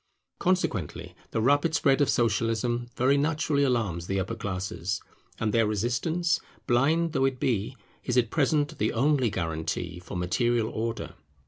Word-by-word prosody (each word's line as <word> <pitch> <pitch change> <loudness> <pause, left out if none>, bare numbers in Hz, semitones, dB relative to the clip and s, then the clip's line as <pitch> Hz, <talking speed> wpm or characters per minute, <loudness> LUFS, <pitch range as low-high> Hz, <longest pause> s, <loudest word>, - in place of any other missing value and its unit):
Consequently 175 - -1 0.2
the 110 - -1
rapid 145 +5 +3
spread 140 -1 +3
of 145 - +3
Socialism 115 +1 +1
very 135 +3 +3
naturally 150 0 +1
alarms 110 -11 0
the 95 0 0
upper 95 - -2
classes; 95 -2 -3 0.4
and 110 -2 0
their 115 -2 +3
resistance, 125 - 0 0.3
blind 155 +7 +2
though 135 -2 +2
it 135 -2 -1
be, 120 +2 -1 0.3
is 125 -1 -1
at 120 -3 +2
present 150 +1 +1
the 110 - +1
only 135 +2 +2
legal 100 -5 0
guarantee 80 +1 -3
for 90 +1 -7
material 115 +6 +1
order. 115 +1 -4
120 Hz, 150 wpm, -27 LUFS, 105-140 Hz, 0.4 s, rapid